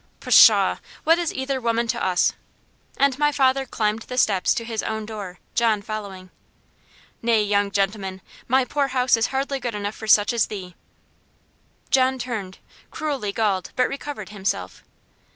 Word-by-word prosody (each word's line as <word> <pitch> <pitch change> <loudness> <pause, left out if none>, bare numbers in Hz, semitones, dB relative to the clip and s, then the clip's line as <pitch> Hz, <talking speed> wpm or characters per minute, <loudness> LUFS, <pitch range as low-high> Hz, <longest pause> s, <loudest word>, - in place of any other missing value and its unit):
"Pshaw! - - +6 0.3
What 330 +2 +4
is 340 -2 -1
either 265 0 -3
woman 230 0 0
to - - -1
us?" 180 -1 +2 0.6
And 280 -1 +2
my 295 0 +3
father 270 -1 +2
climbed 215 -1 -1
the 250 +2 -7
steps 195 -7 +2
to 230 - -2
his 225 -1 -3
own 220 -1 -4
door, 205 -5 -7 0.2
John 225 -4 +1
following. 200 -4 -7 0.9
"Nay, 230 -2 +2
young 205 -1 +1
gentleman, 195 -1 -2 0.3
my 260 +1 +3
poor 280 +2 0
house 255 -2 +2
is 225 0 +1
hardly 270 +1 -2
good 240 -3 -4
enough 205 0 -3
for 220 - -9
such 210 +1 +5
as 230 -3 +1
thee." 185 -4 -7 1.2
John 260 0 +3
turned, 220 -7 -5 0.3
cruelly 280 -10 -3
galled, 200 -3 -1
but 250 - +2
recovered 280 +1 -6
himself. 190 - -4
225 Hz, 155 wpm, -23 LUFS, 205-260 Hz, 1.2 s, Pshaw